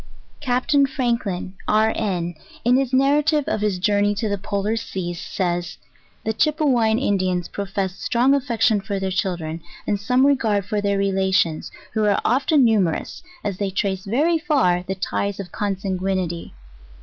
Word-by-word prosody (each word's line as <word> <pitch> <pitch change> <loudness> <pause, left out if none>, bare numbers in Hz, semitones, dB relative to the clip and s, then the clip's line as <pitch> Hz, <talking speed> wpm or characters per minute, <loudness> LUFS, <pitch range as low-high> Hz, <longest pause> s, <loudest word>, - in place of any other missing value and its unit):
CAPTAIN 275 +1 +2
FRANKLIN, 235 -9 -2
(R. 220 +1 +3
N.) 175 -5 -1 0.3
in 245 +1 +5
his 265 -2 0
narative 290 +3 +3
of 215 - -1
his 210 -3 0
jour 205 +3 +2
ney 205 0 +2
to 215 +2 -2
the 200 -1 -2
Polar 205 +2 -1
Seas, 175 -5 -4
says, 175 -2 -2 0.5
"The 220 - -1
Chypewyan 255 -6 +2
Indians 185 -7 0
pro 200 - -5
fess 190 -1 -3
strong 250 +3 +2
affection 235 -6 +2
for 200 0 -3
their 190 0 -2
children, 170 -3 -2 0.2
and 205 - 0
some 250 +6 +3
regard 220 -8 +2
for 210 0 -1
their 200 -1 +1
relations, 190 -4 +1 0.2
who 220 - +1
are 205 -1 +3
often 275 +3 +3
numerous, 200 -8 0 0.2
as 200 -3 -3
they 200 -1 0
trace 190 0 -1
very 305 +11 +2
far 270 - +2
the 190 - -2
ties 200 +1 -2
of 190 -3 -6
consanguinity. 190 - -2
205 Hz, 160 wpm, -22 LUFS, 190-245 Hz, 0.5 s, in